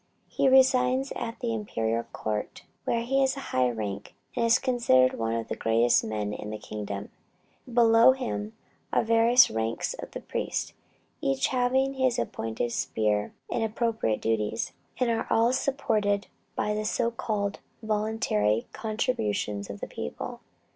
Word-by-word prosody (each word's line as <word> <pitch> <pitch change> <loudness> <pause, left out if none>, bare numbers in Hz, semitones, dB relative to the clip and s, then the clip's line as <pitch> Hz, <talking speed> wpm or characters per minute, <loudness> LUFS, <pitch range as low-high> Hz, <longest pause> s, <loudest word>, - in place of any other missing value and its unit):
He 270 - +2
resides 260 0 +4
at 230 +3 -5
the 235 -2 -1
imperial 115 - -1
court, 105 -1 -4 0.2
where 230 0 0
he 270 +3 +1
has 265 +1 +1
a 275 - -7
high 125 -1 +3
rank, 105 -4 -5 0.2
and 240 - +1
is 230 0 +5
considered 235 - +3
one 115 0 0
of 115 -1 -3
the - - -3
greatest 115 +1 +3
men 105 -1 -3
in 105 - -6
the 110 - -4
kingdom. 105 -1 -6 0.6
Below 230 +1 +6
him 225 -5 -4 0.4
are - - +2
various 230 +2 +5
ranks 110 +1 -2
of - - -8 0.2
priests, - - -2 0.5
each 135 -1 +1
having 260 +1 +2
his 260 -2 +1
appointed 115 - -2
sphere 105 -2 0 0.2
and 230 - 0
appropriate 220 - 0
duties, 110 0 0 0.3
and 235 -2 +1
all 230 +2 +3
supported 215 -7 0 0.3
by 210 - 0
the 215 0 -2
so 230 +2 0
called 205 -3 -2 0.2
voluntary 210 - 0
contributions 110 - -2
of 100 0 -7
the - - -4
people. 75 - -6
215 Hz, 145 wpm, -27 LUFS, -, 0.6 s, Below